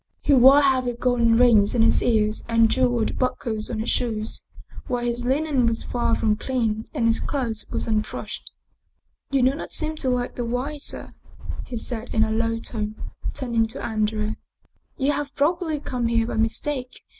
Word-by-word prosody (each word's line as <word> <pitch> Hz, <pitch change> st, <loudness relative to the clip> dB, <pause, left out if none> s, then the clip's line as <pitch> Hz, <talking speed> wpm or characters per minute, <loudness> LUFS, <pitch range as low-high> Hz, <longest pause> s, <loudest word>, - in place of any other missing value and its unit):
He 290 Hz, -, +3 dB
wore 265 Hz, +2 st, +8 dB
heavy 260 Hz, -3 st, +2 dB
golden 235 Hz, -1 st, +2 dB
rings 230 Hz, -3 st, +5 dB
in 230 Hz, -, +4 dB
his 230 Hz, -, +4 dB
ears 215 Hz, -2 st, +1 dB
and 230 Hz, -1 st, +4 dB
jeweled 245 Hz, -3 st, +1 dB
buckles 225 Hz, -4 st, -2 dB
on 235 Hz, -, -3 dB
his 220 Hz, +2 st, -1 dB
shoes, 220 Hz, -2 st, -2 dB, 0.4 s
while 245 Hz, -2 st, -1 dB
his 240 Hz, 0 st, -2 dB
linen 270 Hz, -1 st, +1 dB
was 230 Hz, 0 st, 0 dB
far 240 Hz, -1 st, 0 dB
from 215 Hz, -1 st, +1 dB
clean 225 Hz, -4 st, -1 dB
and 230 Hz, -, -1 dB
his 230 Hz, 0 st, +3 dB
clothes 235 Hz, -6 st, -3 dB
were -, -, -2 dB
unbrushed.. 215 Hz, -1 st, -3 dB, 0.4 s
" -, -, -50 dB
You 275 Hz, -2 st, +2 dB
do 260 Hz, +2 st, +4 dB
not 290 Hz, -, -7 dB
seem 315 Hz, 0 st, -1 dB
to 265 Hz, -, +1 dB
like 245 Hz, -1 st, -1 dB
the 245 Hz, -, -1 dB
wine, 250 Hz, +6 st, -3 dB
sir," -, -, -5 dB, 0.5 s
he 245 Hz, -, -5 dB
said 230 Hz, +1 st, -2 dB
in 220 Hz, -, +4 dB
a 220 Hz, -, -1 dB
low 230 Hz, +1 st, 0 dB
tone, 215 Hz, -2 st, -4 dB, 0.4 s
turning 235 Hz, -3 st, 0 dB
to 235 Hz, +5 st, -6 dB
Andrea. 215 Hz, -1 st, -1 dB, 0.3 s
" -, -, -45 dB
You 280 Hz, -1 st, +2 dB
have 285 Hz, 0 st, -4 dB
probably 320 Hz, +1 st, 0 dB
come 250 Hz, -4 st, -2 dB
here 230 Hz, -1 st, +2 dB
by 225 Hz, -, -4 dB
mistake. 250 Hz, +4 st, -2 dB
240 Hz, 185 wpm, -24 LUFS, 225-260 Hz, 0.5 s, wore